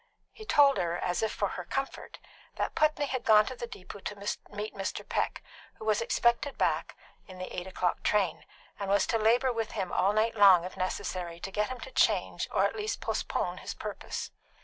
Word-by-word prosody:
He 435 - -11
told 285 - +5
her, 175 -1 0
as 180 0 -1
if 220 -1 0
for 200 - -1
her 180 - -5
comfort, 270 +10 -4 0.4
that - - -2
Putney 305 -1 +2
had 260 -3 -3
gone 215 -1 +6
to 255 - -5
the 240 - -5
depot 205 -3 -10
to 205 - -5 0.3
meet 210 +1 -5
Mr. 195 -1 -4
Peck, - - -1 0.3
who 220 - -10
was 215 -1 +2
expected 235 +4 +1
back - - 0 0.3
in 185 -1 -11
the 185 0 -6
eight 180 +1 -4
o'clock 180 -1 -1
train, 200 -5 +1 0.4
and 200 -1 -3
was 200 +1 +4
to 225 - 0
labour 245 +4 +3
with 225 -2 -3
him 190 -4 -2
all 195 +2 +3
night 215 +2 +2
long 195 -5 +7
if 185 - -7
necessary 185 -2 -3
to 195 - -5
get 210 +1 0
him 255 -1 -5
to 265 - -8
change, - - +2
or - - +3
at - - -1
least 425 0 -2
postpone, - - -2
his - - -6
purpose. - - -5
210 Hz, 205 wpm, -30 LUFS, 185-245 Hz, 0.4 s, long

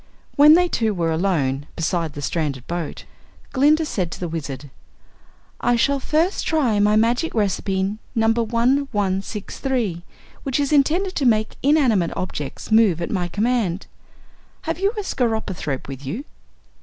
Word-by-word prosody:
When 300 +2 +8
they 355 +1 +4
two 225 - 0
were 165 -2 0
alone 150 -6 0
beside 165 -2 -1
the 145 - -7
stranded 140 -5 -2
boat, 170 -3 -5 0.5
Glinda 300 +4 +4
said 185 - -2
to - - -7
the 175 - -3
Wizard: 145 -4 -6 0.9
"I 245 - +2
shall 275 +4 +2
first 320 +8 0
try 260 -10 +2
my 210 +1 +4
magic 240 +8 +1
recipe 195 -1 0 0.2
No. 225 -1 +2
1163, 230 -3 -1 0.4
which 270 0 -1
is 285 +1 0
intended 335 +7 +2
to 280 - 0
make 220 -2 +1
inanimate 255 - +2
objects 150 0 -5
move 215 -7 +4
at 170 - -3
my 180 -3 -1
command. 205 -2 0 0.8
Have - - -3
you 395 +1 +2
a 415 - -2
skeropythrope 220 - -2
with 135 0 -8
you?" 205 - -5
215 Hz, 145 wpm, -22 LUFS, 170-270 Hz, 0.9 s, When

